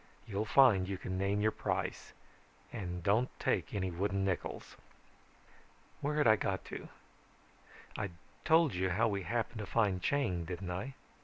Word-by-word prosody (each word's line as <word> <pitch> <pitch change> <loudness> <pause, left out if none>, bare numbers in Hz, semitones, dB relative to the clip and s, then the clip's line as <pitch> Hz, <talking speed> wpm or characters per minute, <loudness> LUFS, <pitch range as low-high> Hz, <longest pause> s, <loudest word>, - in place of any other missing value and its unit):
You'll 105 0 -2
find 110 -6 +5
you 95 - -2
can 95 0 -4
name 100 +1 +1
your 110 +1 +3
price - - -3 0.6
and 90 -3 -4
don't 110 +7 +3
take - - 0
any 95 -2 -1
wooden 100 +2 0
nickels. 95 -3 -3 1.2
"Where 150 +1 -1
had 150 - +3
I 110 -1 +6
got 95 -1 -2
to? - - -7 1.1
I'd 100 -4 -3 0.3
told 160 -2 +4
you 90 +1 0
how 110 +6 +2
we 100 -2 -1
happened 115 +2 -2
to 105 - -5
find 100 -6 +1
Chang, 90 - 0
hadn't 90 +1 -4
I? 125 +10 -4
100 Hz, 155 wpm, -33 LUFS, 95-115 Hz, 1.2 s, I